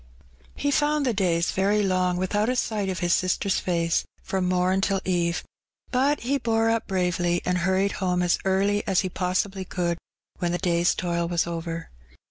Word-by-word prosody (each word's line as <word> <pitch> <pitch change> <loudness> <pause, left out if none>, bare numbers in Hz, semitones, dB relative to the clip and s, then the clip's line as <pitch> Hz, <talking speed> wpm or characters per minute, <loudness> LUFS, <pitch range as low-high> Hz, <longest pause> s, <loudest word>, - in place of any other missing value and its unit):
He 285 - -1
found 295 0 +2
the 245 - +1
days 175 -4 +1
very 205 +2 +2
long 185 -2 +1
without 205 +4 0
a 255 - +1
sight 210 -5 -1
of 185 -1 -3
his 175 0 +2
sister's 185 +1 +1
face 170 -2 0 0.2
from 185 -2 -1
mom 185 +1 +2
till 195 0 +1
eve. 175 -2 0 0.5
But 275 +4 +2
he 275 +4 0
bore 225 -1 +2
up 230 -1 -1
bravely, 180 -2 0
and 180 0 +1
hurried 190 +3 +1
home 180 -2 0
as 175 - +2
early 195 +2 +2
as 190 -2 +3
he 185 - -2
possibly 185 +2 -1
could 175 -2 -2 0.4
when 175 -1 0
the - - +1
day's 175 -1 +2
toil 170 -1 -1
was 170 0 +1
over. 165 -1 -5
185 Hz, 180 wpm, -25 LUFS, 175-205 Hz, 0.5 s, as